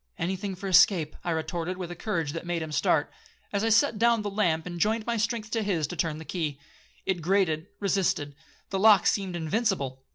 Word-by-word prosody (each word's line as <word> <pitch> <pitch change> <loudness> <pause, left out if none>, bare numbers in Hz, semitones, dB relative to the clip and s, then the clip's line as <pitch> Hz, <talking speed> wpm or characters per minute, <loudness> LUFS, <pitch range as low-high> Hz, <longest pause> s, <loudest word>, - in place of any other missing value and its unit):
'—'Any 185 +3 -1
thing 195 0 -5
for 195 +2 -6
escape,' 175 -4 +4
I - - -3
retorted 170 +2 -2
with 180 -2 -5
a - - -6
courage 165 -6 -2
that 165 - -5
made 175 -1 -2
him 155 - -7
start, 145 - +1 0.4
as 200 +1 0
I 225 - +2
set 225 0 +3
down 235 -1 +3
the 205 - -3
lamp, 175 -6 +1
and 175 -1 -6
joined 215 +3 +1
my 235 - -1
strength 225 0 -2
to 225 - 0
his 185 -7 0
to 160 - -6
turn 160 -3 -1
the 160 - -9
key. 155 -6 -3 0.5
It 185 -3 -1
grated, 170 -2 +1
resisted; 185 -7 0 0.4
the 195 - -1
lock 210 -2 +6
seemed 190 -3 0
invincible. 160 - -1
185 Hz, 215 wpm, -27 LUFS, 160-210 Hz, 0.5 s, lock